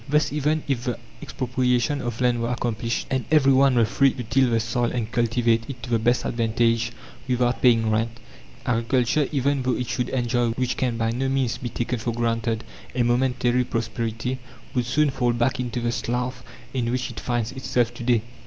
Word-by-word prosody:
Thus, 150 Hz, -1 st, +2 dB
even 150 Hz, +1 st, +1 dB
if 130 Hz, -3 st, -1 dB
the 125 Hz, -2 st, -1 dB, 0.2 s
expropriation 125 Hz, +1 st, 0 dB
of 120 Hz, -1 st, -4 dB
land 120 Hz, -1 st, +2 dB
were 115 Hz, -, -1 dB
accomplished, 120 Hz, -1 st, -2 dB
and 130 Hz, -2 st, +1 dB
every 140 Hz, -4 st, +5 dB
one 135 Hz, 0 st, +5 dB
were 115 Hz, -2 st, +5 dB
free 135 Hz, +5 st, +3 dB
to 125 Hz, -, -5 dB
till 130 Hz, +3 st, +2 dB
the 115 Hz, -1 st, +2 dB
soil 115 Hz, +2 st, 0 dB
and 115 Hz, -2 st, -3 dB
cultivate 115 Hz, 0 st, +1 dB
it 125 Hz, -4 st, -7 dB
to 120 Hz, -, -6 dB
the 115 Hz, -, +3 dB
best 120 Hz, +2 st, +2 dB
advantage, 115 Hz, 0 st, +1 dB, 0.4 s
without 125 Hz, -1 st, +1 dB
paying 115 Hz, -3 st, +4 dB
rent, 115 Hz, +2 st, -1 dB, 0.5 s
agriculture, 125 Hz, +3 st, +1 dB
even 140 Hz, -1 st, +1 dB
though 125 Hz, -1 st, +1 dB
it 125 Hz, -, -2 dB
should 125 Hz, -, -1 dB
enjoy 120 Hz, -1 st, +1 dB
which 125 Hz, +1 st, -1 dB
can 125 Hz, -3 st, -1 dB
by 115 Hz, 0 st, 0 dB
no 130 Hz, +3 st, -1 dB
means 130 Hz, -3 st, 0 dB
be 125 Hz, -, -4 dB
taken 120 Hz, +1 st, -2 dB
for 115 Hz, +1 st, -2 dB
granted 115 Hz, -1 st, -1 dB, 0.3 s
a 125 Hz, -, +2 dB
momentary 125 Hz, 0 st, +2 dB
prosperity, 115 Hz, +1 st, -3 dB, 0.3 s
would 125 Hz, -2 st, 0 dB
soon 145 Hz, +4 st, +2 dB
fall 125 Hz, -3 st, +1 dB
back 120 Hz, +2 st, 0 dB
into 125 Hz, -1 st, -2 dB
the 120 Hz, 0 st, 0 dB
slough 125 Hz, +2 st, -2 dB, 0.3 s
in 120 Hz, -3 st, 0 dB
which 125 Hz, +1 st, -1 dB
it -, -, -7 dB
finds 120 Hz, -2 st, -1 dB
itself 120 Hz, -2 st, 0 dB
to 120 Hz, -, -8 dB
day. 120 Hz, -2 st, +3 dB
120 Hz, 195 wpm, -24 LUFS, 115-130 Hz, 0.5 s, every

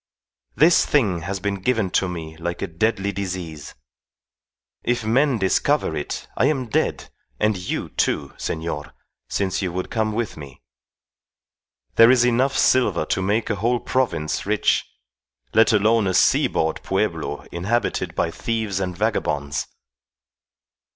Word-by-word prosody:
This 165 Hz, +3 st, +5 dB
thing 105 Hz, -12 st, +2 dB
has 95 Hz, +4 st, -4 dB
been 100 Hz, 0 st, -3 dB
given 110 Hz, -4 st, 0 dB
to 95 Hz, -, +2 dB
me 80 Hz, -3 st, -6 dB
like 85 Hz, +1 st, -4 dB
a -, -, -1 dB
deadly 100 Hz, +3 st, 0 dB
disease. 90 Hz, -6 st, -5 dB, 1.1 s
If 120 Hz, -2 st, 0 dB
men 130 Hz, +3 st, +3 dB
discover 100 Hz, -, +1 dB
it 75 Hz, -, -4 dB
I 115 Hz, -, +2 dB
am 135 Hz, -5 st, -1 dB
dead, -, -, -1 dB, 0.3 s
and 105 Hz, 0 st, +2 dB
you, 90 Hz, 0 st, -4 dB
too, -, -, -1 dB
senor, 80 Hz, -3 st, -4 dB, 0.3 s
since 95 Hz, -1 st, -1 dB
you 95 Hz, -3 st, -2 dB
would 90 Hz, +1 st, -4 dB
come 110 Hz, -2 st, 0 dB
with 115 Hz, -5 st, -3 dB
me. 70 Hz, -5 st, -11 dB, 1.3 s
There 115 Hz, +1 st, +8 dB
is 125 Hz, -1 st, +5 dB
enough 125 Hz, +3 st, +2 dB
silver 105 Hz, -11 st, +3 dB
to 95 Hz, -, -1 dB
make 105 Hz, +4 st, 0 dB
a 105 Hz, -, -1 dB
whole 120 Hz, +4 st, +1 dB
province 115 Hz, -15 st, -1 dB
rich, 105 Hz, +1 st, +1 dB, 0.7 s
let 110 Hz, 0 st, +5 dB
alone 110 Hz, 0 st, +3 dB
a 95 Hz, -, 0 dB
seaboard 80 Hz, -2 st, +2 dB
pueblo 75 Hz, -, -2 dB
inhabited 105 Hz, +8 st, -1 dB
by 85 Hz, -, 0 dB
thieves 110 Hz, -1 st, -2 dB
and 90 Hz, -2 st, -3 dB
vagabonds. 75 Hz, -10 st, -1 dB
100 Hz, 135 wpm, -22 LUFS, 85-115 Hz, 1.3 s, There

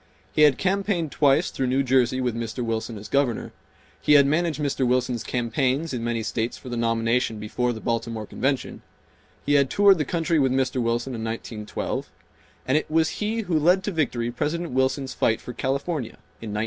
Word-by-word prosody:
He -, -, +2 dB
had 150 Hz, -3 st, +6 dB
campaigned 190 Hz, -4 st, 0 dB
twice 145 Hz, +3 st, +3 dB
through 130 Hz, -, -1 dB
New 130 Hz, +2 st, +2 dB
Jersey 130 Hz, -1 st, +2 dB
with 125 Hz, -2 st, 0 dB
Mr. 115 Hz, +1 st, -4 dB
Wilson 115 Hz, 0 st, -3 dB
as 105 Hz, -, -9 dB
Governor; 140 Hz, -5 st, 0 dB, 0.5 s
he 150 Hz, -, +4 dB
had 140 Hz, -1 st, +7 dB
managed 155 Hz, +2 st, 0 dB
Mr. 140 Hz, -2 st, -1 dB
Wilson's 125 Hz, -1 st, +1 dB
campaigns 130 Hz, +5 st, -1 dB
in 120 Hz, -2 st, -3 dB
many 115 Hz, -1 st, -1 dB
states 110 Hz, +2 st, -2 dB
for 130 Hz, -, -10 dB
the 120 Hz, -, -3 dB
nomination 115 Hz, 0 st, +1 dB
before 120 Hz, +4 st, -1 dB
the 110 Hz, -, -5 dB
Baltimore 115 Hz, -2 st, -2 dB
Convention; 135 Hz, +5 st, -2 dB, 0.6 s
he 145 Hz, -, +2 dB
had 140 Hz, -2 st, +4 dB
toured 200 Hz, +2 st, +5 dB
the -, -, +2 dB
country 165 Hz, +1 st, 0 dB
with 135 Hz, -2 st, +2 dB
Mr. 130 Hz, -1 st, 0 dB
Wilson 120 Hz, +2 st, -1 dB
in 115 Hz, -2 st, -5 dB
1912; 110 Hz, -1 st, -4 dB, 0.6 s
and 135 Hz, +4 st, +4 dB
it -, -, -9 dB
was 160 Hz, 0 st, +2 dB
he 220 Hz, +2 st, 0 dB
who 175 Hz, -7 st, 0 dB
led 180 Hz, +5 st, +3 dB
to 205 Hz, -, -2 dB
victory 125 Hz, -8 st, -1 dB
President 170 Hz, +7 st, -2 dB
Wilson's 130 Hz, +1 st, 0 dB
fight 110 Hz, -, +1 dB
for 125 Hz, -, -8 dB
California 140 Hz, 0 st, -2 dB, 0.2 s
in 115 Hz, -, -6 dB
1916. 105 Hz, 0 st, -3 dB
130 Hz, 190 wpm, -24 LUFS, 115-150 Hz, 0.6 s, had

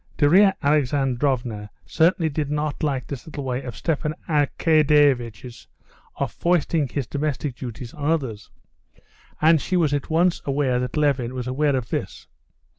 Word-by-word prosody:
Darya 190 Hz, +7 st, +5 dB
Alexandrovna 130 Hz, -6 st, 0 dB, 0.2 s
certainly 165 Hz, +1 st, +2 dB
did 150 Hz, -1 st, -2 dB
not 150 Hz, 0 st, -2 dB
like 140 Hz, -4 st, -1 dB
this 140 Hz, 0 st, -8 dB
little 150 Hz, -3 st, -6 dB
way 130 Hz, 0 st, -2 dB
of 120 Hz, -4 st, -7 dB
Stepan 155 Hz, -1 st, -2 dB
Arkadyevitch's 145 Hz, -, +2 dB, 0.5 s
of -, -, -2 dB
foisting 170 Hz, -3 st, +1 dB
his 135 Hz, +1 st, -3 dB
domestic 145 Hz, 0 st, -3 dB
duties 120 Hz, -1 st, -8 dB
on 145 Hz, 0 st, -3 dB
others. 130 Hz, -10 st, -2 dB, 0.9 s
And 160 Hz, -1 st, +5 dB
she 185 Hz, -, -1 dB
was 155 Hz, -5 st, +2 dB
at 145 Hz, -2 st, -2 dB
once 170 Hz, +2 st, +2 dB
aware 135 Hz, -3 st, 0 dB
that 125 Hz, +3 st, -3 dB
Levin 135 Hz, -5 st, +1 dB
was 125 Hz, -1 st, -4 dB
aware 140 Hz, +3 st, +1 dB
of 125 Hz, -2 st, -3 dB
this. -, -, -4 dB
145 Hz, 145 wpm, -23 LUFS, 125-155 Hz, 0.9 s, Darya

